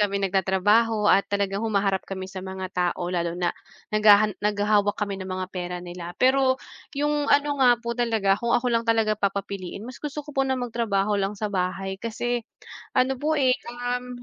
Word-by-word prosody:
kami 200 -1 +1
nagtatrabaho 205 +4 +2
at 195 - +3
talagang 200 0 -1
humaharap 200 -3 +1
kami 190 -1 -5
sa 190 - -6
mga 190 0 -6
tao, 180 0 -1
lalo 170 -1 -1
na 175 -1 0 0.4
naghahan 210 0 +6
naghahawak 205 0 +2
kami 200 -2 -3
ng 190 - -6
mga 185 0 -3
pera 180 -1 -4
nila. 175 0 -8
Pero, 260 0 +3 0.4
'yong 295 0 0
ano 285 -1 +2
nga 245 -2 +6
po 235 0 -4
talaga, 220 -5 +1
kung 235 0 +2
ako 245 0 0
lang 230 0 0
talaga 225 -1 +3
papapiliin, 200 0 -3
mas 250 0 -9
gusto 295 0 -5
ko 295 - -10
po 270 -1 +1
ng 265 - +1
magtrabaho 225 -5 -1
lang 195 +2 -2
sa 210 0 -3
bahay 190 +1 -2
kasi, 240 +1 -2 0.6
ano 260 +1 +3
po, 310 +1 +1
eh, 260 -2 +4
um, 245 0 -4
210 Hz, 180 wpm, -25 LUFS, 195-245 Hz, 0.6 s, naghahan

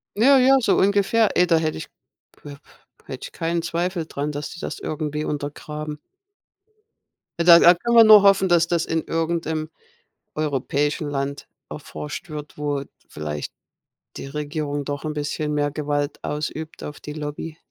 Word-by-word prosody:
Ja, 265 +6 +6
ja, 265 +2 +6
so 240 - +2
ungefähr. 200 +3 +2
Ey, 180 - +5
da 170 -2 +3
hätte 155 -1 -1
ich - - -7 0.5
früher 145 -1 -11 0.5
hätte - - -8
ich - - -16
keinen 165 +1 -2
Zweifel 175 +1 -2
daran, 145 -1 -4
dass 145 0 -5
die 170 - -10
das - - -5
irgendwie 150 0 -3
untergraben. 150 +1 -5 1.4
Ja, 170 - +1
da 170 -1 +9
da 175 - +8
kann 235 +7 -2
man 230 -1 +9
nur 215 -1 +9
hoffen, 195 -1 +4
dass 170 -1 +4
das 170 -1 +1
in 160 0 -1
irgendeinem 160 -1 -2 0.7
europäischen 150 +1 -1
Land 140 0 -4 0.2
erforscht 75 - -7
wird, 150 -1 -8
wo 145 -2 -2 0.3
vielleicht 75 -1 -5 0.7
die - - -7
Regierung 145 0 -4
doch 145 +2 -4
'n 155 - -3
bisschen 150 0 -3
mehr 145 0 0
Gewalt 145 0 -3
ausübt 155 +1 -5
auf 150 - -8
die 150 - -8
Lobby. 150 +1 -6
155 Hz, 160 wpm, -22 LUFS, 145-170 Hz, 1.4 s, da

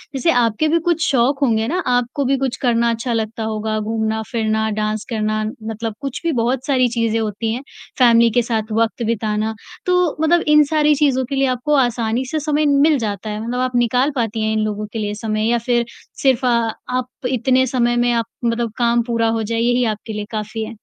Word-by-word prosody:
जैसे 330 +5 +2
आपके 240 +4 +2
भी 335 +2 +2
कुछ 335 -2 +1
शौक 270 +2 +2
होंगे 225 -4 +2
ना, 350 +6 -1
आपको 245 +3 0
भी 270 +1 +2
कुछ 265 -1 -1
करना 235 -2 +2
अच्छा 230 +1 -2
लगता 225 0 -2
होगा 215 0 -2
घूमना-फिरना, 220 0 -1
डांस 215 0 -2
करना, 215 -1 -1 0.2
मतलब 225 0 -4
कुछ 275 -2 -4
भी 335 - +1
बहुत 245 +3 0
सारी 255 -3 +3
चीज़ें 230 -1 0
होती 220 +1 -2
हैं। 250 - -4 0.4
फ़ैमिली 235 -1 +6
के 245 - +6
साथ 220 -2 -2
वक़्त 230 +1 0
बिताना 220 -1 -1 0.3
तो 360 -3 +2
मतलब 335 +2 +3
इन 300 0 +6
सारी 300 -1 +3
चीज़ों 265 -3 +2
के 275 +2 -4
लिए 270 0 +2
आपको 255 +4 -1
आसानी 240 -1 +1
से 310 - 0
समय 300 0 0
मिल 290 +1 +4
जाता 210 -1 -4
है। 210 +1 -4
मतलब 245 +2 -3
आप 255 -1 -1
निकाल 250 +4 +2
पाती 225 -3 -1
हैं 220 0 0
इन 220 - 0
लोगों 210 0 -3
के 225 - -3
लिए 205 -1 -2
समय 215 0 -1
या 240 - +3
फ़िर 235 0 0 0.4
सिर्फ़ 260 -2 +3
अ, - - +3 0.4
आप 255 0 -2 0.2
इतने 260 +1 +2
समय 240 -1 +1
में 240 0 +2
आप 230 -1 0 0.2
मतलब 230 -1 0
काम 235 -1 +2
पूरा 230 -1 +1
हो 225 - -1
जाए 230 +2 -2
यही 245 +1 +2
आपके 215 +1 -9
लिए 210 0 -4
काफ़ी 220 0 -4
है? - - -8
235 Hz, 210 wpm, -19 LUFS, 220-260 Hz, 0.4 s, फ़ैमिली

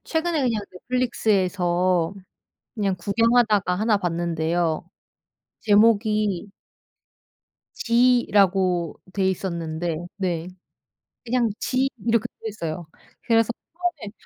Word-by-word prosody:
최근에 320 -2 0
그냥 230 -4 0
넷플릭스에서 185 -6 0 0.6
그냥 200 -4 0
구경하다가 210 0 +2
1 215 +2 +2
봤는데요. 170 -1 -1 0.7
제목이 210 -2 +2 1.2
'지' 240 +1 +3
라고 185 -4 +2
돼 190 -1 +1
있었는데 170 -3 -3 0.2
네. 175 -3 -2 0.8
그냥 240 -1 +1
'지' 265 +1 0 0.2
이렇게 230 -1 +2 0.2
되어 225 - -4
있어요. 170 -5 -5 0.4
그래서 230 -1 +3 0.2
처음에 330 - -4
200 Hz, 215 characters per minute, -23 LUFS, 175-230 Hz, 1.2 s, 지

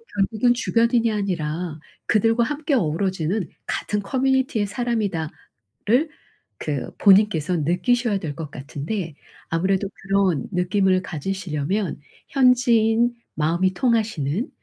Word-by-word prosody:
결국은 220 +4 +2
'주변인이 235 -1 +2
아니라 175 -5 -2 0.3
그들과 225 +2 +3
함께 295 +3 -2
어우러지는 185 - 0 0.2
같은 210 -1 -2
커뮤니티의 260 -2 +1
사람이다.'를 210 -8 -3 1.1
그 145 -4 -3
본인께서 190 -5 +4
느끼셔야 205 - +1
될 145 -5 -5
것 155 -3 -6
같은데 155 +6 -5 0.4
아무래도 190 +4 +1
그런 195 -7 0
느낌을 185 +1 +2
가지시려면 180 +1 -3 0.3
현지인, 240 -3 +3 0.2
마음이 170 +5 +1
통하시는 220 - 0
195 Hz, 285 characters per minute, -23 LUFS, 165-230 Hz, 1.1 s, 본인께서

